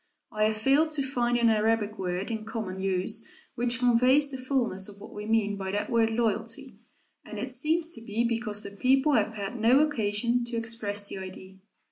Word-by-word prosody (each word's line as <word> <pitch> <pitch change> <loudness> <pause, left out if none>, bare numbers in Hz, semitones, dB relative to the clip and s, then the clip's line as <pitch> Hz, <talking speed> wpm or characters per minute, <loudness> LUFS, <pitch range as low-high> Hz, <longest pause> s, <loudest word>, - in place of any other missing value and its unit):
I 215 0 +1
have 215 0 +1
failed 275 +8 +3
to 285 -2 +2
find 245 -2 0
an 235 -1 +4
Arabic 220 0 +1
word 185 +3 -2
in 220 -1 -3
common 215 -4 -5
use 195 +4 0 0.2
which 245 +1 +1
conveys 255 +4 +4
the 265 - -4
fullness 240 -8 -1
of 200 0 -12
what - - -11
we 210 0 -7
mean 215 -2 +1
by 190 -1 -4
that 205 +5 -2
word 230 -1 +3
"loyalty," 225 -1 -2 0.4
and - - -9
it 260 - -4
seems 315 +6 0
to 230 - -6
be 225 +1 -1
because 225 -3 -2
the 200 - -7
people 265 +7 +2
have 220 -2 +1
had 205 +3 -5
no 235 +5 +5
occasion 235 -4 +1
to 235 -1 -4
express 215 -3 -2
the 195 - -5
idea. 190 0 -10
225 Hz, 195 wpm, -28 LUFS, 205-245 Hz, 0.4 s, no